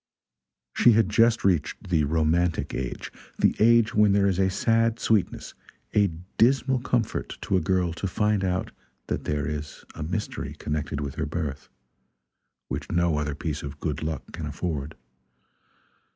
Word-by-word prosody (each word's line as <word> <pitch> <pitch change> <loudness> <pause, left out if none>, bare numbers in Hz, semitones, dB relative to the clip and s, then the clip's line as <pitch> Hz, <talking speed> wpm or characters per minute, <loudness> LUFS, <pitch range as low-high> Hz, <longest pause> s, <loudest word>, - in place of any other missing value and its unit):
She 120 - +6
had 110 -2 +3
just 115 +2 +3
reached 90 -5 0
the 80 -4 +3
romantic 80 +2 +1
age 65 -2 -4 0.3
the - - +3
age 115 0 +5
when 105 -1 +4
there 100 0 +3
is 95 -2 +1
a 95 0 +3
sad 115 +3 +2
sweetness, 110 -4 0 0.4
a 105 -1 +4 0.3
dismal 130 +2 +3
comfort 120 -3 -2
to - - 0
a 90 - +3
girl 90 0 +1
to 95 - -3
find 105 +1 +1
out 95 0 -1 0.3
that - - -3
there 75 -1 -1
is 75 -1 -5
a 80 - -8
mystery 90 +7 -4
connected 75 -1 -3
with 70 -2 -4
her - - -1
birth, 75 -3 -4 1.0
which - - -5
no 85 -3 +2
other 75 -1 -2
piece 75 -1 -3
of 70 0 -7
good 75 -1 -3
luck 80 -2 -4
can 80 -3 -5
afford. 75 -1 -4
85 Hz, 155 wpm, -26 LUFS, 75-105 Hz, 1.0 s, She